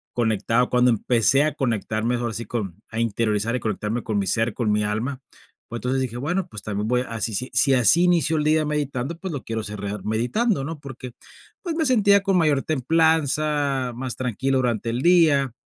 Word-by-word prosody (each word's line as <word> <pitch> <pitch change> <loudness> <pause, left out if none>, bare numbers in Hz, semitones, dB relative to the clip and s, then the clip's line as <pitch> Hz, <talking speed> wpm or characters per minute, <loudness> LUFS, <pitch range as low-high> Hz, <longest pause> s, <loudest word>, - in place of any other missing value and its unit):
conectaba, 115 +1 +1
cuando 125 0 +3
empecé 120 +5 +2
a 155 -2 0
conectarme, 115 -2 -1
ahora 120 -2 -3
sí 115 +1 -5
con 105 -4 -5
a 110 - -4
interiorizar 115 0 0
y - - -1
conectarme 110 +1 -3
con 105 -2 -2
mi 100 - 0
ser, 115 +1 0
con 110 -3 0
mi 105 0 +1
alma. 120 +6 -3 0.5
Pues 120 -1 -6
entonces, 130 +1 -1
dije: 120 -2 -4
"Bueno, 175 +7 -2
pues, 105 -2 -9
también 105 +1 -3
voy 125 +1 +1
a 115 -1 -5
si 110 - -2
si 125 +6 -3
si 135 -1 +3
así 130 - +5
inicio 165 -3 +2
el 150 - 0
día 155 +1 +3
meditando, 145 0 -3
pues, 185 -3 -6
lo 130 -7 -5
quiero 115 -1 -4
cerrar 105 -1 -6
meditando", 135 - 0
¿no? 155 +1 -6
Porque, 130 -3 -9 0.5
pues, 345 -3 -3
me 320 -1 0
sentía 205 -6 +4
con 195 -2 +1
mayor 150 -5 +2
templanza, 150 -2 +1
más 125 -1 -4
tranquilo 130 +2 -1
durante 115 -2 -1
el 120 - -2
día, 155 -6 +4
125 Hz, 200 wpm, -23 LUFS, 115-150 Hz, 0.5 s, así